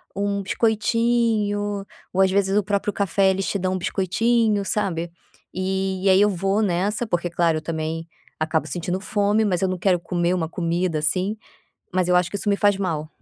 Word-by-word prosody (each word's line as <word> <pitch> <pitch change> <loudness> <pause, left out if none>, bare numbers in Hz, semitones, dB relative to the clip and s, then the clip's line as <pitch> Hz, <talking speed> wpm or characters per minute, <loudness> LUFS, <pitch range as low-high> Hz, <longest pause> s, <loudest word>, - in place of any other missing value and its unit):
um 200 0 -1
biscoitinho 215 -2 +1 0.3
ou, 190 - +2
às 190 -1 +4
vezes, 195 0 +2
o 210 - +3
próprio 205 0 -1
café. 195 0 +2
Eles 195 0 -2
te 200 - -1
dão 185 0 -1
um - - -1
biscoitinho, 210 +3 +1
sabe, 175 -5 -2 0.4
e 190 0 -2
e - - +5
aí 190 +1 +6
eu 210 - +5
vou 195 +3 0
nessa 205 +4 0
porque, 175 -4 -1
claro, 165 -1 +1
eu - - -4
também 165 0 -4 0.3
acabo 155 0 0
sentindo 180 +2 -3
fome, 205 +1 +1
mas 185 -4 0
eu 190 - +2
não 185 0 -2
quero 180 -1 +2
comer 175 0 0
uma 165 -3 -1
comida, 170 -1 -1
assim, 185 +7 0 0.6
mas 185 -1 +1
eu 180 - +4
acho 180 -1 +2
que 200 - -3
isso 205 - -3
me 200 - +2
faz 205 -1 +3
mal, 160 -6 -2
190 Hz, 195 wpm, -23 LUFS, 175-205 Hz, 0.6 s, aí